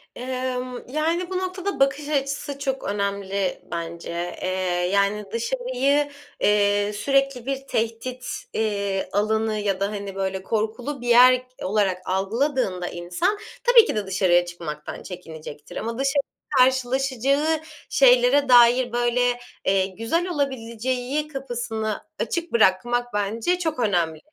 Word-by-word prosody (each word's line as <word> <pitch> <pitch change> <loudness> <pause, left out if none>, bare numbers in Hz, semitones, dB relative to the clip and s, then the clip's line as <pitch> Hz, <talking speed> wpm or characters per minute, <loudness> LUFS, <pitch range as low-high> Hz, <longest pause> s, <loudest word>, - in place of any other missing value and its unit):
Emm, 255 0 -3
yani, 325 +5 0
bu 370 - -2
noktada 375 +1 -3
bakış 275 +2 +1
açısı 280 0 -2
çok 270 -1 -2
önemli 200 -1 -2
bence. 170 0 -5 0.3
Eee, - - -1 0.4
yani, 200 +1 +2
dışarıyı, 260 +4 0 0.3
eee, 205 0 +2
sürekli 275 +2 +1
bir 270 0 -3
tehdit, 230 +3 -3 0.3
eee, 200 -3 -1
alanı 220 +1 +1
ya 200 -2 -1
da, 200 0 0
hani, 200 -2 -5
böyle, 190 -1 -2
korkulu 225 +6 -2
bir 245 - -6
yer 250 +1 +7
k 255 - -10
olarak 195 -2 +1
algıladığında 195 -1 0
insan 180 - -1 0.3
tabii 485 -2 +7
ki, - - -2
de 210 -1 -1
dışarıya 185 -2 +3
çıkmaktan 165 -4 -7
çekinecektir 160 -5 -9
ama 230 +1 -3
dışarıda 275 0 0 0.3
karşılaşacağı 265 +4 +2 0.3
şeylere 260 +1 +5
dair, 245 0 +6
böyle, 240 +1 +1 0.3
eee, 190 -1 +3
güzel 230 - -1
olabileceği 260 -1 -2
kapısını 240 -6 -4 0.2
açık 340 0 -2
bırakmak 240 +3 +2
bence 225 - 0
çok 320 -5 -2
önemli. 175 -8 +1
240 Hz, 125 wpm, -24 LUFS, 200-275 Hz, 0.4 s, yer